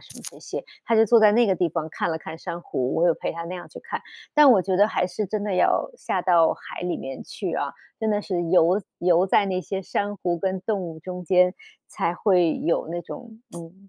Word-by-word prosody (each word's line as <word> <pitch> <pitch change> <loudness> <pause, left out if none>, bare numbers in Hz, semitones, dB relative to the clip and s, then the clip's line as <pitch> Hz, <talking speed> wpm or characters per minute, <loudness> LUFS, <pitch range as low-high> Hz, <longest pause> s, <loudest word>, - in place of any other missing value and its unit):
什 - - -8
么 - - -7
这 - - -15
些， - - -6 0.2
他 230 - +2
就 225 - +6
坐 230 +1 +6
在 215 -1 +7
那 235 +2 +4
个 190 - +2
地 175 -1 +1
方 160 0 -3
看 165 - -2
了 160 - -1
看 160 0 -8
珊 170 0 -6
瑚， 125 -4 -2
我 170 - +3
有 170 - +5
陪 - - -4
他 170 0 -6
那 180 +2 -6
样 175 - -8
去 - - -11
看， - - -5 0.3
但 300 -2 +8
我 210 -6 +6
觉 190 0 -1
得 205 +3 +5
还 180 - 0
是 185 +4 -3
真 205 +2 -3
的 205 -3 -1
要 180 - +2
下 - - -1
到 170 -3 +4
海 - - -10
里 180 0 -2
面 135 0 -7
去 - - -5
啊， - - -2 0.3
真 220 -1 0
的 205 - +1
是 180 -4 -2
游 180 +3 +4 0.2
游 175 +1 +3
在 200 +1 +3
那 185 -1 -1
些 195 +1 -4
珊 205 +2 -3
瑚 175 -2 -1
跟 190 +1 -2
动 205 -1 -1
物 165 -2 -7
中 180 +2 -7
间 180 +1 +4 0.3
才 170 - -2
会 180 -4 +2
有 165 - 0
那 175 +1 -3
种， 220 +6 -10 0.2
嗯， 180 +4 -12
180 Hz, 270 characters per minute, -24 LUFS, 170-205 Hz, 0.3 s, 但